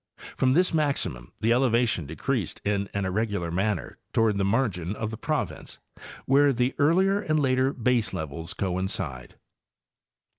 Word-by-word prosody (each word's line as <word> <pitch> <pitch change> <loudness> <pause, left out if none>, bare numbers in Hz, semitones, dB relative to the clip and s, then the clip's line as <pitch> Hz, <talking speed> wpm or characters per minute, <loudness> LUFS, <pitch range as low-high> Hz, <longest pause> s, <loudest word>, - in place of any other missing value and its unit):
From 130 0 +2
this 180 +4 +3
maximum 140 - -1
the 115 - +2
eleva 120 -1 +3
tion 85 -9 -2
decreased 75 0 -2
in 100 -1 0
an 100 -1 -2
irregular 95 -3 -1
manner 95 +1 -2
toward 110 -3 +2
the - - +2
margin 100 -4 0
of 110 0 -3
the - - -4
province, 155 +2 -3 0.5
where 140 +1 +5
the 125 +1 0
earlier 190 +7 +3
and 155 -5 +1
later 130 -1 +2
baselevels 95 - -2
coincide. 90 -9 -3
110 Hz, 140 wpm, -26 LUFS, 95-135 Hz, 0.5 s, where